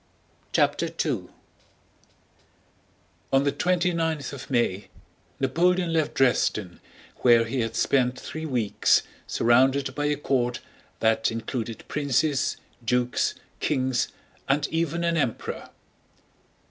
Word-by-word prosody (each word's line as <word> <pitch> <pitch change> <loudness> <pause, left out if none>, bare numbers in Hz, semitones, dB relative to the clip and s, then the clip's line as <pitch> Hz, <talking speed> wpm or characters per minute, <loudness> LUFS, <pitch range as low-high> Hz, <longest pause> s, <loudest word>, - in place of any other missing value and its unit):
CHAPTER - - +2 0.2
II - - -1 2.1
On 135 +1 +4
the 140 - +2
twenty 180 +1 +1
ninth 160 -4 -1
of 140 - -8
May 120 -6 0 0.5
Napoleon 170 +5 +2
left 160 -2 0
Dresden, 105 -7 +1 0.4
where 120 -2 +5
he 130 +3 -2
had 115 -1 -2
spent 125 -2 +2
three 160 0 -6
weeks 120 -7 +2 0.2
surrounded 130 +3 +3
by 145 +2 -2
a 150 - +1
court 125 -4 0 0.4
that 110 0 +3
included 115 0 -5
princes, 145 0 0 0.3
dukes, 125 +1 +1 0.2
kings, 130 -3 0 0.4
and 140 +1 +2
even 165 +1 -1
an 170 0 +1
emperor. 130 -8 -2
135 Hz, 110 wpm, -26 LUFS, 120-155 Hz, 2.1 s, where